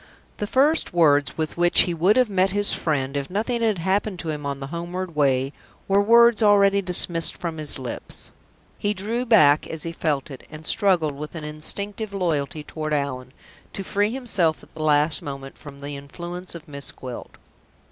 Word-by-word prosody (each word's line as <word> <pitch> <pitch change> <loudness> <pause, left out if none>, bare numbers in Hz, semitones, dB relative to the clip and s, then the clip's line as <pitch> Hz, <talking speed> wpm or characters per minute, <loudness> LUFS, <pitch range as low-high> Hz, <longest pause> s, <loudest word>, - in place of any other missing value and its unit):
The 210 - -3
first 285 - +2
words 145 -4 +3
with 155 0 -3
which 175 0 +5
he 175 - 0
would 180 +6 +3
have 255 -1 +4
met 190 -2 +1
his 205 +1 +3
friend, 135 -4 -2
if 140 -1 -3
nothing 225 +5 -2
had 220 -4 +1
happened 190 +3 -1
to 165 - -5
him 150 -1 -5
on 140 -1 -4
the 135 - -6
homeward 175 0 -5
way, 135 -1 +1 0.3
were 195 +1 +3
words 235 +2 +5
already 200 -1 +4
dismissed 175 -2 +4
from 165 -2 -5
his 150 -1 +4
lips. 130 -3 -5 0.5
He 205 0 -1
drew 230 +6 -2
back 155 -10 +5
as 160 -2 -6
he 165 - -4
felt 150 -4 -2
it, 135 - -9
and 155 0 -11
struggled, 175 -7 +2
with 150 +4 -8
an 160 - -6
instinctive 200 +7 -2
loyalty 155 -5 -2
toward 155 0 -4
Allan, 130 -3 -4 0.4
to 195 - -5
free 205 +2 0
himself 210 -11 -1
at - - -19
the 155 - -8
last 150 +1 +2
moment 135 -3 -8
from 140 -2 -13
the 145 0 -6
influence 175 +6 -8
of 170 0 -11
Miss 140 -1 -4
Gwilt. 125 -2 -9
170 Hz, 190 wpm, -23 LUFS, 145-200 Hz, 0.5 s, which